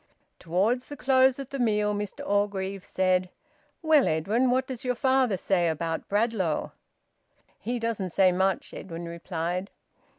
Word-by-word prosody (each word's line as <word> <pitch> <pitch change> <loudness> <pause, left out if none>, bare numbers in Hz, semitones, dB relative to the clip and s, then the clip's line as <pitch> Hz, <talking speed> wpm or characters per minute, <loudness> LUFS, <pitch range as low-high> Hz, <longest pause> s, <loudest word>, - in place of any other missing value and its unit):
Towards 200 +9 0
the 290 - -8
close 260 0 +4
of 275 -2 -8
the 275 - -4
meal, 210 -3 +2
Mr 205 0 -5
Orgreave 200 -1 -1
said 185 -1 +1 0.5
"Well, 310 -4 +5
Edwin, 205 +11 +1
what 255 +2 +2
does 260 -3 -7
your 250 -1 0
father 260 -5 +2
say 175 -1 +1
about 165 0 -2
Bradlaugh?" 205 -6 0 0.9
"He 240 +4 -3
doesn't 230 -5 -2
say 185 +1 +4
much," 190 +1 0
Edwin 170 -2 -7
replied. 170 +2 -4
205 Hz, 140 wpm, -27 LUFS, 180-245 Hz, 0.9 s, Well